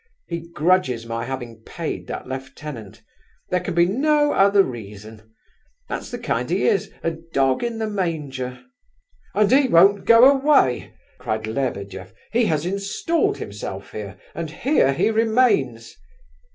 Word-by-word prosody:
He 170 -1 -4
grudges 160 -9 +1
my 115 0 -4
having 120 -3 -6
paid - - -6
that - - -6
lieutenant; 130 -4 -8 0.5
there 180 - +2
can 170 - -5
be 170 0 +5
no 295 +9 +2
other 200 0 +5
reason! 110 - -9 0.6
That's - - -5
the - - -5
kind - - -2
he - - 0
is—a 280 - -1 0.2
dog 135 - +2
in 235 -1 -2
the 220 - -2
manger!" 145 -11 -3 0.7
"And 210 0 +3
he 270 +1 +5
won't 195 0 +5
go 230 +2 +7
away!" 275 - +3 0.2
cried 110 0 -3
Lebedeff. 100 -6 -4 0.2
"He 235 0 +2
has 155 0 0
installed 200 - -1
himself 100 -1 -7
here, 100 -2 -7 0.2
and 165 -2 -5
here 235 - +2
he 140 +10 +1
remains!" 220 - +1
155 Hz, 140 wpm, -22 LUFS, -, 0.7 s, go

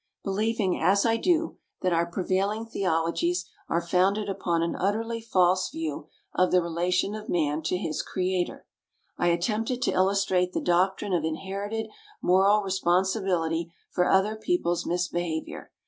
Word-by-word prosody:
Believing, 205 -1 0
as 200 +3 +3
I 225 -1 +3
do, 330 +4 +1 0.2
that 185 -1 +2
our 170 0 +2
prevailing 195 +5 -1
theologies 195 - 0 0.2
are 170 0 0
founded 195 +4 +2
upon 175 -4 0
an 170 - -1
utterly 225 +4 -1
false 185 -4 +2
view 155 -2 -5 0.3
of 185 - +3
the 180 - +4
relation 175 +3 0
of 215 0 -7
man 155 -2 0
to 165 +3 -1
his 160 -5 -2
Creator, 185 -1 -2 0.5
I 175 - +2
attempted 215 +8 0
to - - +2
illustrate 185 -1 +2
the - - 0
doctrine 185 +3 +1
of 170 -3 +1
inherited 200 +7 -3 0.3
moral 195 +3 +4
responsibility 180 -3 0 0.2
for 180 - +1
other 195 +3 +3
people's 220 - -1
misbehavior. 175 -2 -3
185 Hz, 140 wpm, -27 LUFS, 175-205 Hz, 0.5 s, the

